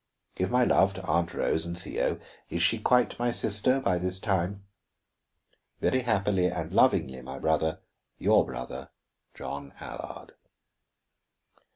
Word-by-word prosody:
Give 90 - -2
my 125 0 +3
love 95 -4 +3
to 95 - -7
Aunt 85 0 0
Rose 80 - 0
and 85 +1 -4
Theo 85 - -2 0.3
is 85 - +1
she 110 +7 +5
quite 125 +2 +2
my 120 0 +1
sister 120 +3 +3
by 90 -9 0
this 90 +1 0
time? 95 0 -2 1.1
Very 130 - +1
happily 100 -6 +1
and - - -4
lovingly, 65 -1 +2
my 65 +2 -8
brother, 80 +4 0 0.4
Your - - +4
brother, 65 +2 -7 0.5
JOHN 70 0 -7
ALLARD. - - -8
90 Hz, 135 wpm, -28 LUFS, 80-105 Hz, 1.1 s, she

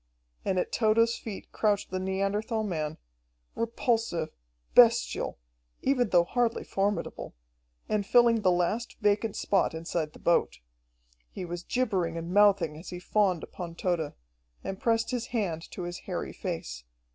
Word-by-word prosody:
And 190 - 0
at 180 - 0
Tode's 230 +1 +3
feet 210 -4 -8
crouched 205 -3 0
the 185 - -1
Neanderthal 195 +4 -1
man, 160 -6 -2 0.6
repulsive, 230 -7 0 0.4
bestial, 235 -1 +5 0.5
even 250 -4 +2
though 175 -2 +5
hardly 235 +5 0
formidable, 200 - -2 0.5
and 210 -1 +1
filling 235 +1 +5
the 190 - +4
last 180 +7 0
vacant 210 0 +1
spot 195 -4 +1
inside 160 -1 -3
the - - -12
boat. 170 - +2 0.7
He 180 - -6
was 175 0 -5
gibbering 185 -8 0
and 165 +2 -4
mouthing 195 -7 +4
as 170 - -9
he 180 - -5
fawned 185 -1 +1
upon 170 -2 -7
Tode 170 -4 -1 0.5
and 195 - -4
pressed 230 +1 +1
his 245 -1 -2
hand 180 -9 -2
to 180 - -6
his 175 0 -5
hairy - - -4
face. - - -5
195 Hz, 145 wpm, -29 LUFS, 175-225 Hz, 0.7 s, bestial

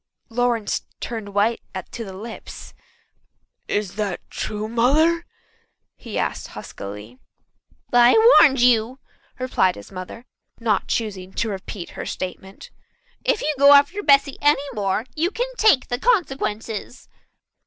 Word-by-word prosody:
Lawrence 240 -2 0 0.2
turned 220 -4 -5
white 220 +3 +2 0.3
to 235 - -6
the 195 - -8
lips, 220 +4 -9 0.9
"Is 205 -2 -2
that 200 -4 -2
true, 210 0 -4
Mother?" 305 +9 +2 0.7
he 230 - -7
asked - - -2
huskily. 105 +5 -9 0.7
"I've 245 - +6 0.2
warned 270 -5 +5
you," 245 0 +3 0.4
replied 255 -8 +1
his 100 - -12
mother, 185 +6 -8 0.3
not 230 -2 0
choosing 195 -5 -3
to 230 - -1
repeat 190 -2 -7
her - - -7
statement. 190 +1 -7 0.5
"If - - +1
you 305 +1 0
go 280 +1 +8
after 285 +9 +3
Bessy 280 -5 +3
any 290 -1 +3
more 205 0 -1
you 330 +3 +1
can 480 +5 -2
take 420 -13 +4
the 245 - -2
consequences." 270 - -1
230 Hz, 125 wpm, -22 LUFS, 205-275 Hz, 0.9 s, go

